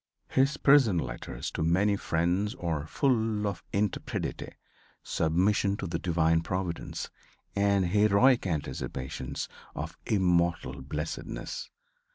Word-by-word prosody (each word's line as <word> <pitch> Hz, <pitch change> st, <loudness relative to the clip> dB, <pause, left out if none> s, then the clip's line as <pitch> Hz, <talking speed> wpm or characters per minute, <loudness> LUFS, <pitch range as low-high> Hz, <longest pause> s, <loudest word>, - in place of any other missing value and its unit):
His 135 Hz, +3 st, +2 dB
prison 135 Hz, -11 st, +5 dB
letters -, -, -4 dB
to -, -, -4 dB
many 95 Hz, +6 st, +3 dB
friends 90 Hz, +5 st, 0 dB
are 80 Hz, -, -2 dB
full 110 Hz, -, +1 dB
of 100 Hz, -, -3 dB
intrepidity, 100 Hz, -1 st, -2 dB, 0.5 s
submission 100 Hz, +5 st, +1 dB
to -, -, -4 dB
the 85 Hz, -2 st, -2 dB
divine 80 Hz, -2 st, +2 dB
providence 90 Hz, 0 st, -3 dB, 0.4 s
and 100 Hz, -1 st, +3 dB
heroic 105 Hz, +5 st, +4 dB
anticipations 65 Hz, -5 st, -4 dB, 0.3 s
of -, -, -5 dB
immortal 85 Hz, -7 st, +1 dB
blessedness. 75 Hz, +4 st, -5 dB
95 Hz, 105 wpm, -29 LUFS, 80-105 Hz, 0.5 s, prison